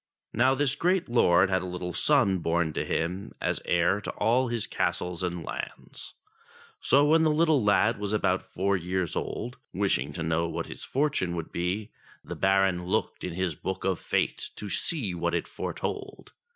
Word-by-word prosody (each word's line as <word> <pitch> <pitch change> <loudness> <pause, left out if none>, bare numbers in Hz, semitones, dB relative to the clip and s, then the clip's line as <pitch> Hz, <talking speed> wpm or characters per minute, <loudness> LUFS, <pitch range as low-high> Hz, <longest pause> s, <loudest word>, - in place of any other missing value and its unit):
Now 130 +3 +4
this 140 -1 +1
great 180 0 +1
lord 95 -5 +4
had 95 - +2
a 95 - -5
little 90 0 -4
son 115 -11 +3
born 85 -1 0
to - - -1
him 90 +4 -2
as - - -1
heir 85 +4 +2
to - - -5
all 125 +3 +2
his 115 -3 -1
castles 90 -1 -2
and 90 -2 -2
lands. - - -7 0.6
So, 140 +1 +4
when 160 +2 +5
the 160 - +4
little 155 -4 +3
lad 105 +2 +3
was 105 -1 -2
about 95 -3 +1
four 100 +2 0
years 90 -1 -2
old, 125 +3 -4 0.2
wishing 90 -9 0
to 80 - -4
know 80 +1 +1
what - - -3
his - - -9
fortune 135 -11 0
would 85 -2 -5
be, 95 +5 -2 0.3
the - - -6
Baron 95 -2 +2
looked - - -1
in 90 - -3
his 90 -1 -1
Book 95 +5 -5
of 95 -2 +1
Fate - - -1
to 105 -2 -6
see 115 - 0
what 85 0 -1
it 85 - -2
foretold. - - -5
95 Hz, 180 wpm, -28 LUFS, 85-120 Hz, 0.6 s, when